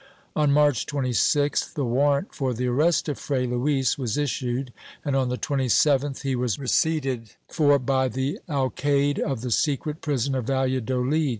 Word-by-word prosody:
On 150 -2 +3
March 145 -4 +3
26th 145 +2 0
the 145 - -1
warrant 140 - +1
for 130 -4 -2
the 125 +3 -2
arrest 150 +9 +2
of 145 - -3
Fray 130 -3 -1
Luis 130 +2 0
was 120 -3 -2
issued 125 -2 -2 0.3
and, 140 -2 0
on 130 -2 +1
the 125 - -2
27th 140 +1 +1
he 135 -1 0
was 120 -4 -1
receipted 135 -5 -1
for 145 -3 +3
by 130 0 +1
the 130 +3 -3
alcaide 140 0 0
of 135 -7 -2
the 125 0 -4
secret 150 +4 0
prison 140 -3 -1
of 130 -3 -2
Valladolid. 130 +2 0
135 Hz, 160 wpm, -25 LUFS, 125-145 Hz, 0.3 s, On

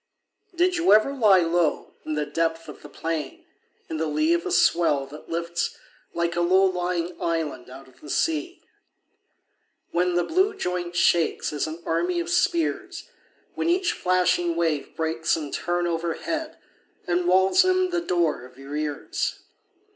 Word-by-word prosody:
Did 360 +1 +2
you 345 +2 +4
ever 215 +6 +4
lie 210 -8 +5
low 165 -1 0
In 155 - -1
the 150 0 -1
depth 165 +2 -2
of - - -11
the 145 - -11
plain, 160 0 -4 0.2
& - - -41
In 160 - -4
the 160 0 -1
lee 155 +2 +2
of 170 0 -1
a - - -3
swell 150 -5 +3
that 150 +3 -12
lifts 170 +1 -2 0.4
Like 170 0 -1
a 175 - +1
low 185 +3 +4
lying 180 -2 -1
island 165 -5 -2
out 135 +1 -12
of 130 - -22
the 150 - -11
sea, 325 - -1 1.3
When 180 +1 +1
the 175 - +2
blue 380 - +1
joint 180 - -3
shakes 170 -2 +2
As 150 +1 -1
an 160 +2 -8
army 345 - 0
of 345 +1 -3
spears; 350 +1 0 0.4
When - - -1
each 355 +1 +2
flashing 180 -2 +1
wave 160 -4 -1
breaks 160 0 0
In 150 -3 -6
turn 175 0 -1
overhead 170 - -3 0.5
And 175 0 0
wails 190 - +5
in 370 0 +2
the 350 -1 0
door 170 - 0
of 125 0 -15
your 135 +2 -8
ears 150 -1 -3
175 Hz, 165 wpm, -25 LUFS, 160-220 Hz, 1.3 s, lie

